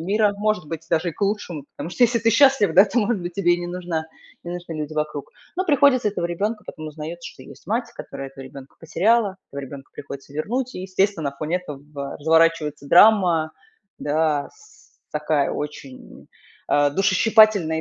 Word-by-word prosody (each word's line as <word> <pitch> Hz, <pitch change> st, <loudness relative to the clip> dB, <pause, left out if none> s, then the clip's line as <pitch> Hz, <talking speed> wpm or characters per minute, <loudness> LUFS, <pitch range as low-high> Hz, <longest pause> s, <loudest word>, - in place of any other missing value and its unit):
мира. 205 Hz, +4 st, +2 dB
Может 210 Hz, -5 st, -1 dB
быть, 165 Hz, +1 st, -6 dB
даже 170 Hz, +1 st, +1 dB
и -, -, -11 dB
к -, -, -19 dB
лучшему, 190 Hz, -8 st, -2 dB
потому -, -, -5 dB
что 245 Hz, -, -1 dB
если 240 Hz, 0 st, +4 dB
ты 230 Hz, 0 st, +2 dB
счастлив 265 Hz, -2 st, +4 dB
да, 195 Hz, +3 st, +8 dB
то, 230 Hz, +4 st, -1 dB
может 210 Hz, -4 st, 0 dB
быть, 175 Hz, 0 st, -6 dB
тебе 175 Hz, -3 st, +3 dB
и 175 Hz, -, -5 dB
не 175 Hz, -, -5 dB
нужна 175 Hz, -3 st, -4 dB, 0.4 s
не 170 Hz, -, -7 dB
нужны 175 Hz, -1 st, -7 dB
люди 155 Hz, -1 st, -5 dB
вокруг. 150 Hz, -2 st, -3 dB, 0.3 s
Но 370 Hz, -, 0 dB
приходится 280 Hz, -, +4 dB
этого 185 Hz, -4 st, -2 dB
ребёнка 210 Hz, +6 st, -3 dB
потом 155 Hz, 0 st, -7 dB
узнаётся, 160 Hz, +3 st, -7 dB
что -, -, -15 dB
есть -, -, -14 dB
мать, 230 Hz, +2 st, -1 dB
которая 135 Hz, -, -7 dB
этого 135 Hz, 0 st, -11 dB
ребёнка 135 Hz, +1 st, -12 dB
потеряла. 195 Hz, +5 st, +1 dB, 0.2 s
Этого 140 Hz, -, -5 dB
ребёнка 135 Hz, 0 st, -10 dB
приходится 140 Hz, 0 st, -9 dB
вернуть. 245 Hz, -, -3 dB
И, -, -, -5 dB
естественно, 190 Hz, -5 st, 0 dB
на 140 Hz, -, -19 dB
фоне 160 Hz, +3 st, -1 dB
этого 145 Hz, -4 st, -8 dB
разворачивается 160 Hz, -2 st, +2 dB
драма, 175 Hz, -4 st, +5 dB, 0.5 s
да, 150 Hz, -1 st, 0 dB
с 435 Hz, 0 st, -22 dB, 0.2 s
такая 150 Hz, -2 st, 0 dB
очень, 140 Hz, -3 st, -8 dB, 0.4 s
а, 145 Hz, 0 st, +3 dB
душещипательная. 195 Hz, -1 st, +4 dB
170 Hz, 180 wpm, -22 LUFS, 150-210 Hz, 0.5 s, да